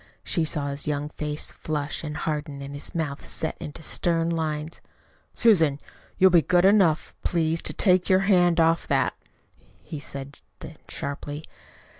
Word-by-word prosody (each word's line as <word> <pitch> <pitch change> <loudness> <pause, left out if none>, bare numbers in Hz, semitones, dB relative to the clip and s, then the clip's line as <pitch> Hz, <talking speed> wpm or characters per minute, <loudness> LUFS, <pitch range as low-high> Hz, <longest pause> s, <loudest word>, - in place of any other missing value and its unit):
She 165 -3 +1
saw 145 -2 -2
his 140 +1 -6
young 145 0 -1
face 150 0 -3
flush 150 -1 -3
and 150 -1 -5
harden 150 -2 -3
and 140 +1 -7
his 145 +4 -3
mouth 150 -4 -3
set 160 - -2
into 150 +2 -7
stern 165 +1 +1
lines. 155 -1 -3 0.5
"Susan, 165 -11 +4 0.4
you'll 190 -1 +6
be 170 -2 +6
good 175 +5 +3
enough, 190 -6 +3
please, 165 -1 0
to - - -1
take 185 -2 +3
your 190 0 +5
hand 180 -3 +3
off 165 0 +3
that," - - +1 0.7
he 155 - -8
said 140 -1 -7 0.2
then - - -10
sharply. 145 +2 -5
155 Hz, 155 wpm, -25 LUFS, 145-170 Hz, 0.7 s, you'll